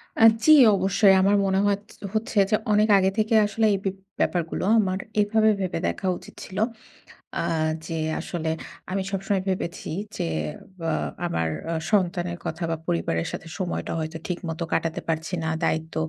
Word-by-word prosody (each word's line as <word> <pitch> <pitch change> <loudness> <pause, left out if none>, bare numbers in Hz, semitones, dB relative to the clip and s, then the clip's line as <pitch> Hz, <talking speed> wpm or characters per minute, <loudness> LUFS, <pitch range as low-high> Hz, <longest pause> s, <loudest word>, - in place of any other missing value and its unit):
আ - - -2 0.2
জি, 310 - +6 0.2
অবশ্যই। 195 +1 +4
আমার 200 +2 +4
মনে 190 0 +2
হতচ 205 +1 -1 0.3
হচ্ছে 215 0 -2
যে, 215 - +4 0.2
অনেক 210 +1 +4
আগে 190 0 +3
থেকে 215 +1 +1
আসলে 220 +2 0
এই - - +1
বিপ 195 0 -1 0.2
ব্যাপারগুলো 170 -2 0 0.2
আমার 190 -2 0 0.2
এভাবে 220 +1 +3
ভেবে 185 -3 -2
দেখা 190 - -2
উচিত - - -14
ছিল। 190 - -9 0.8
আ - - -1 0.4
যে, 165 0 -4 0.2
আসলে 165 -3 -3 0.4
আমি 195 +1 0
সবসময় 195 0 0
ভেবেছি 180 -2 -3 0.3
যে, - - -1 0.5
বা 165 -1 -1 0.3
আমার 80 - 0 0.2
আ - - 0 0.2
সন্তানের 175 -3 +1
কথা 165 +2 -4
বা 165 - 0
পরিবারের 85 0 0
সাথে - - -7
সময়টা 185 -3 -3
হয়তো 160 +1 -4
ঠিকমতো 170 -2 -3
কাটাতে 165 0 -1
পারছি 160 +2 -2
না, 160 - -1
দায়িত্ব 160 0 -1
185 Hz, 160 wpm, -25 LUFS, 165-200 Hz, 0.8 s, জি